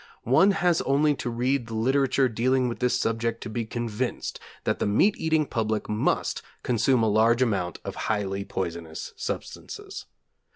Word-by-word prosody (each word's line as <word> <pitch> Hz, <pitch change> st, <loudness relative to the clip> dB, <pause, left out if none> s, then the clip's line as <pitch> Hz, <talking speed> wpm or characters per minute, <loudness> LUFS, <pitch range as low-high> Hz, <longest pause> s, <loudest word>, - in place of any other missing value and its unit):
One 135 Hz, -, +5 dB
has 180 Hz, -4 st, +2 dB
only 145 Hz, +2 st, +3 dB
to -, -, -3 dB
read 125 Hz, +1 st, 0 dB
the 115 Hz, -, -5 dB
literature 135 Hz, +3 st, +2 dB
dealing 125 Hz, +2 st, +1 dB
with 120 Hz, -, -4 dB
this 125 Hz, -1 st, +1 dB
subject 115 Hz, 0 st, -1 dB
to 110 Hz, -, -6 dB
be 115 Hz, +1 st, -2 dB
convinced 120 Hz, +1 st, -3 dB, 0.2 s
that -, -, 0 dB
the -, -, 0 dB
meat 115 Hz, -, +4 dB
eating 160 Hz, -1 st, +1 dB
public 110 Hz, -4 st, -1 dB
must 105 Hz, +1 st, 0 dB, 0.2 s
consume 120 Hz, +1 st, +2 dB
a -, -, +3 dB
large 115 Hz, +4 st, +4 dB
amount 95 Hz, -8 st, -1 dB
of -, -, -4 dB, 0.2 s
highly 100 Hz, -2 st, -1 dB
poisonous 85 Hz, -4 st, -5 dB
substances. -, -, -6 dB
115 Hz, 160 wpm, -26 LUFS, 110-130 Hz, 0.2 s, One